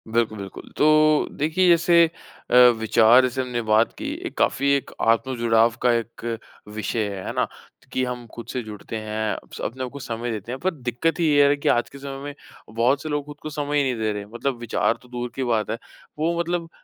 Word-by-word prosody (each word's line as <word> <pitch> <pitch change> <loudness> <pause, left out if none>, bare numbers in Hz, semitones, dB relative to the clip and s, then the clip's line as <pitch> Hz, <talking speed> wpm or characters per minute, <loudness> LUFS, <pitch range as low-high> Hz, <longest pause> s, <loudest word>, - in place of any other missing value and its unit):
बिल्कुल, 110 -1 0
बिल्कुल, 100 -1 -9
तो 155 0 +4
देखिए 160 +5 +2
जैसे 170 0 +6 0.5
अ, - - +4 0.2
विचार 110 +2 +5
जैसे 130 0 -1
हमने 125 -2 -3
बात 110 +1 +3
की - - -6 0.2
एक - - -6
काफ़ी 140 +1 +2
एक 140 - -3
आत्म-जुड़ाव 115 -1 +2
का 125 - +4
एक 115 0 -4 0.5
विषय 110 0 -1
है, 95 -2 -6
है - - -3
ना? - - +1 0.4
कि 130 - 0
हम 125 -1 -5
खुद 120 - -8
से 125 - -2
जुड़ते 105 0 -8
हैं 110 0 -2 0.2
स - - -8
अपने 130 +3 -4
आप 125 - -4
को 140 - -8
समय 120 -3 -4
देते 110 +1 -5
हैं 130 - -5
पर 185 +5 0
दिक्कत 145 +4 -2
ये 145 -4 +5
है 145 - +3
कि 145 - -1
आज 120 - +2
के 140 - -12
समय 135 0 -6
में 145 0 -5 0.4
बहुत 125 +5 +2
से 155 - -5
लोग 150 -1 -2
खुद 145 0 -10
को 155 - -5
समय 145 -1 -2
ही 145 - +3
नहीं 130 -2 0
दे 110 -1 +1
रहे 105 - -4
हैं। 100 - -15
मतलब 130 +2 -2
विचार 115 0 0
तो 125 - -18
दूर 120 0 -4
की 135 - -2
बात 115 -4 0
है, 110 - -2 0.4
वो 170 +2 0
मतलब 170 -1 -2
125 Hz, 225 wpm, -23 LUFS, 115-145 Hz, 0.5 s, जैसे